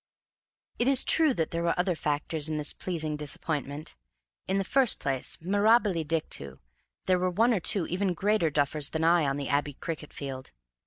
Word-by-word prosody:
It 240 - +2
is 270 -2 +5
true 320 -2 +3
that 160 -1 -1
there 170 - -2
were 170 0 +1
other 180 +1 +1
factors 150 0 -1
in 155 - -2
this 150 0 -3
pleasing 160 -4 -3
disappointment. 150 0 -2 0.5
In 190 - 0
the 195 - +1
first 255 +3 +3
place, 135 -2 -2
mirabile 205 0 +2
dictu, 150 - -3 0.5
there 185 -1 +2
were 185 0 +1
one 225 +7 +2
or 210 - +1
two 180 +1 +2
even 185 +1 -1
greater 205 -2 +1
duffers 145 0 0
than 160 0 -2
I 165 -2 +4
on 135 +1 -1
the 140 - -4
Abbey 145 +1 0
cricket 155 -1 -6
field. 135 - -7
165 Hz, 180 wpm, -28 LUFS, 150-190 Hz, 0.5 s, is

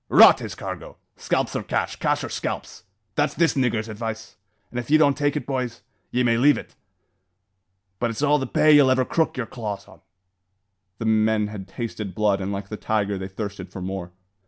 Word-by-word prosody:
"Rot - - +8
his - - -6
cargo! - - -7 0.2
Scalps - - -1
or - - 0
cash, - - -2
cash - - 0
or - - -4
scalps! - - -5 0.3
that's 145 +1 0
this 165 -1 +3
niggur's 120 -5 +1
advice; 110 0 -6 0.4
an' 120 - -3
if 120 - -6
ye 155 - +6
don't 145 -3 +4
take 145 0 0
it, 135 - -4
boys, 125 -3 -3 0.3
ye 125 +1 +1
may 115 -1 +3
leave 145 +4 +5
it! - - -9 1.3
but 120 - +1
it's 115 +5 -3
all 150 0 +4
the 135 - -3
pay 155 +4 +4
ye'll 145 -3 +7
ever 130 0 +3
crook 160 0 0
yer 125 - -1
claws 110 -4 -6
on." - - -17 1.0
The 115 - -4
men 110 -1 +2
had 100 -3 -7
tasted 105 -2 -5
blood, 105 -2 +2
and 95 +1 -2
like 100 0 -5
the 105 - -5
tiger, 105 -3 -1
they 95 - -4
thirsted 95 -2 -6
for 95 - -7
more. 90 -1 -5
115 Hz, 200 wpm, -24 LUFS, 100-130 Hz, 1.3 s, Rot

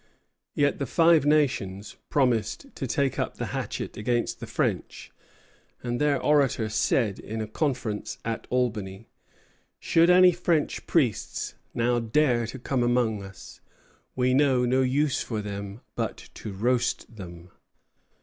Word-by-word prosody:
Yet 145 -1 +2
the 140 - -2
Five 165 -3 +4
Nations 110 -10 +1
promised 125 - 0
to 135 - -4
take 135 +2 0
up - - -2
the - - -4
hatchet - - -4
against 120 +3 -1
the - - -7
French, - - -2 0.7
and 120 +2 -2
their 145 -2 +2
orator 135 -7 +2
said, 110 -1 +1
in 110 +1 -6
a 110 - -2
conference 120 -3 -2
at 115 -1 -3
Albany, 110 -5 -2 0.7
"Should 165 +1 +3
any 180 0 +7
French 170 -3 -1
priests 130 - 0 0.2
now 120 +1 +2
dare 120 0 +2
to 130 - -7
come 130 0 -1
among 120 -3 +1
us, 95 0 -12 0.5
we 125 0 +2
know 130 -2 +3
no 130 +2 +2
use 135 +2 +1
for 110 -3 -3
them 100 +1 -6
but - - -4
to 105 - -7
roast 120 +2 -1
them." 85 -2 -10
125 Hz, 140 wpm, -26 LUFS, 110-140 Hz, 0.7 s, any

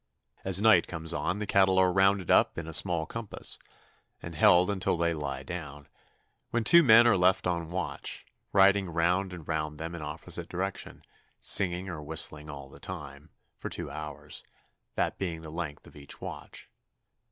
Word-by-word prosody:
As 95 -1 +2
night 110 +2 +5
comes 80 -1 -1
on 80 +5 -2
the 105 - -3
cattle 95 -1 +3
are 95 -1 +4
rounded 95 -1 +2
up - - +4
in 80 - -4
a 80 - -6
small 85 0 +3
compass, 115 +4 -6 0.6
and 85 - -8
held 90 +5 +4
until 95 -3 0
they 85 0 +1
lie 70 -4 -5
down, 75 -2 -8 0.6
when 120 -1 -1
two 170 +10 +7
men 115 -5 +7
are 120 - +5
left 90 0 +2
on 85 -2 -2
watch, 90 0 -5 0.3
riding 95 -1 +4
round 90 +3 0
and 85 -4 -10
round 75 -1 -3
them 80 +2 -6
in 85 - -7
opposite 75 +1 -3
directions, 95 +2 -5 0.4
singing 90 -1 +1
or 85 -5 -6
whistling 75 0 -1
all 70 -2 -8
the 70 - -15
time, 75 -4 -9 0.3
for - - -5
two - - -5
hours, 75 -1 -8 0.5
that - - -1
being 85 -4 -4
the 80 - -8
length 80 -3 -6
of - - -16
each 70 -1 -7
watch. - - -9
85 Hz, 175 wpm, -28 LUFS, 75-95 Hz, 0.6 s, two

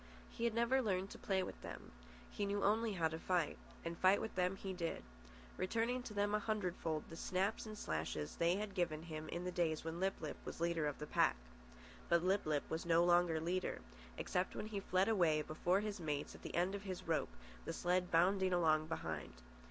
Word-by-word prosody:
He 235 - -2
had 230 -1 +1
never 235 +3 +3
learned 195 -4 0
to - - -9
play 190 -2 +1
with - - -7
them. - - -8 0.4
He 205 - -2
knew 200 0 0
only 220 +2 +3
how 165 -4 +2
to 160 0 -5
fight, 175 -4 0 0.3
and 170 0 -2
fight 185 +3 +5
with 220 - -4
them 180 +1 +1
he 195 0 -5
did, 170 -2 -3 0.5
returning 230 +6 0
to 230 -4 -8
them 205 0 +1
a 210 - +3
hundred 205 -4 -1
fold 155 -2 -1
the 165 - -9
snaps 195 +6 -1
and 215 0 -7
slashes 80 - -3
they 170 +1 +3
had 205 0 -3
given 165 -4 0
him 155 -2 -6
in 175 - -3
the 180 - -2
days 165 -3 0
when 165 +1 -4
Lip 190 +1 +1
lip 155 -2 -5
was - - -6
leader 170 -2 +1
of 145 - -3
the 150 - -5
pack. - - +3 0.7
But 170 0 +4
Lip 190 -1 +2
lip 150 -2 +1
was 160 - -2
no 170 0 +4
longer 175 -2 +4
leader—except 155 - -3
when - - -3
he 215 -2 -3
fled 190 0 +2
away 170 -8 +3
before 175 +6 +1
his 210 -1 -3
mates 150 -3 -2
at - - -12
the - - -6
end 180 +3 +2
of 200 - -3
his 185 -4 -6
rope, 160 - +1 0.4
the - - -2
sled 180 0 +1
bounding 185 +2 +4
along 155 -3 +3
behind. 80 - -4
180 Hz, 215 wpm, -38 LUFS, 160-200 Hz, 0.7 s, fight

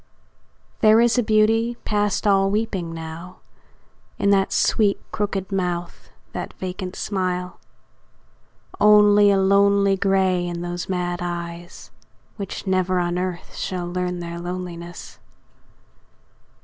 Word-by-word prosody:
There 220 0 +6
is 240 +1 +3
a - - +4
beauty 225 +2 +2
past 205 -1 0
all 195 -1 +3
weeping 200 -5 -2
now 165 +2 -8 0.8
In 200 - +2
that 195 -1 +2
sweet, 205 -3 +2
crooked 200 -2 -3
mouth, 180 -2 -3 0.2
that - - -5
vacant 185 0 -6
smile; 180 -2 -3 1.2
Only 210 -1 +6
a 200 - +4
lonely 200 0 +4
grey 190 -2 +1
in 170 -1 -4
those 175 0 -5
mad 175 -1 -2
eyes, 175 0 -6 0.5
Which 200 0 -6
never 185 -1 +1
on 175 0 0
earth 180 -2 -5
shall 180 -2 -3
learn 180 0 -3
their 170 0 -6
loneliness. 175 -1 -7
185 Hz, 115 wpm, -22 LUFS, 175-200 Hz, 1.2 s, There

